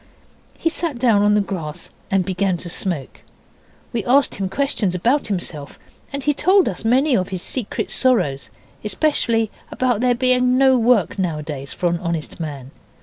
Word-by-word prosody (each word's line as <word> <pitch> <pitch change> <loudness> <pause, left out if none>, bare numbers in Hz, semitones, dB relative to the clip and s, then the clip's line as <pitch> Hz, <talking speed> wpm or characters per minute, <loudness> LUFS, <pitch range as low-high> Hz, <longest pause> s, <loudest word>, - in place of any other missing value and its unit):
He - - -2
sat 325 -4 -2
down 235 -5 +3
on 210 0 +4
the 210 - +3
grass 175 -5 -5 0.2
and 195 -2 +1
began 190 -1 0
to 175 - -7
smoke. 170 -5 -4 0.7
We 230 -3 -1
asked 270 +3 +4
him 195 -1 -3
questions 205 -5 0
about 245 +11 +1
himself, 175 -7 -4 0.3
and 280 0 -4
he 295 - +2
told 370 +6 +3
us 185 - -4
many 260 +5 +3
of 185 -3 0
his 185 -2 -4
secret 250 -6 -3
sorrows 185 - +1 0.3
especially 225 -1 +1 0.2
about 250 -4 0
there 250 -1 +3
being 250 0 +3
no 265 0 +5
work 230 -5 +2
nowadays 150 -6 -3
for - - -5
an 170 0 0
honest 170 -2 -4
man. 140 -5 -6
205 Hz, 165 wpm, -20 LUFS, 175-255 Hz, 0.7 s, no